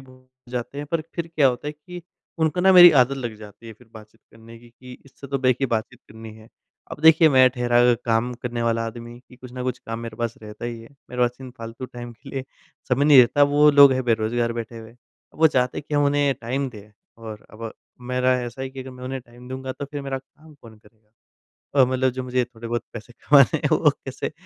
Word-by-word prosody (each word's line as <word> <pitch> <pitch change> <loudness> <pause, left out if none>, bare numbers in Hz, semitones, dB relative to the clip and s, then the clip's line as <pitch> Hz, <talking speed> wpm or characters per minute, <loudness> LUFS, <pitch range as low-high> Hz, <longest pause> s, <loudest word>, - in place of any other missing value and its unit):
ब 130 -1 -19 0.2
जाते 125 +3 -5
हैं, 145 - -5
पर 165 +2 -1
फिर 170 -1 -3
क्या 145 -3 +5
होता 125 +3 -4
है - - -5
कि 175 +4 -12 0.4
उनको 160 +2 0
ना 190 +1 +5
मेरी 175 -1 +10
आदत 130 +2 +1
लग 120 -4 -5
जाती 105 +2 -14
है 115 - -9
फिर 115 +2 -21
बातचीत 110 0 -15
करने 115 +1 -15
की 120 0 -18
कि 125 +1 -14
इससे 140 0 -13
तो 140 0 -2
देखिए 130 +1 +1
बातचीत 115 -3 -3
करनी 110 0 -11
है। 110 0 -16 0.4
अब - - -8
देखिए 160 0 +7
मैं 130 -2 +6
ठहरा 120 -1 0 0.2
क - - -8
काम 115 +1 0
करने 120 -1 -3
वाला 115 0 0
आदमी 120 +1 -9
कि 125 - -17
कुछ 125 -1 -12
न 125 - -5
कुछ 125 -1 -3
काम 115 0 -7
मेरे 115 -2 -8
पास 115 0 -3
रहता 105 +2 -9
ही 120 -1 -5
है। 115 - -14 0.2
मेरे 125 0 -1
पास 120 0 0
इन 130 - -9
फ़ालतू 115 +3 -8
टाइम 120 -1 -9
के 115 - -16
लिए 135 -1 -5 0.4
समय 135 +3 +2
नहीं 145 -3 +7
रहता। 145 +4 +3
वो 145 +1 +5
लोग 140 -1 +7
हैं 130 0 -1
बेरोज़गार 115 +1 0
बैठे 115 0 -7
हुए, 110 0 -13 0.4
वो 160 +1 +4
चाहते 125 -4 0
हैं - - -8
कि 150 - -3
हम 145 0 +3
उन्हें 145 -1 +1
टाइम 130 +4 -2
दें, 105 -2 -14 0.2
और 110 -2 -10
अब 115 0 -8 0.4
मेरा 125 0 +2
ऐसा 120 +2 -7
है 135 - -4
कि 135 - -9
अगर 130 0 -9
मैं 125 0 -11
उन्हें 130 0 -5
टाइम 120 +1 -16
दूँगा 130 0 -6
तो 140 - -7
फिर 145 0 -7
मेरा 135 -1 -4
काम 150 +4 -20
कौन 115 -6 -16
करेगा? 105 0 -26 0.7
और 130 -2 +5
मतलब 130 0 +1
जो 130 +1 -5
मुझे 125 0 0
थोड़े-बहुत 120 0 -5
पैसे 115 +1 -10
कमाने 140 -4 +4
हैं, - - -2
वो - - +4 0.2
कैसे - - -5
125 Hz, 240 wpm, -22 LUFS, 115-135 Hz, 0.7 s, मेरी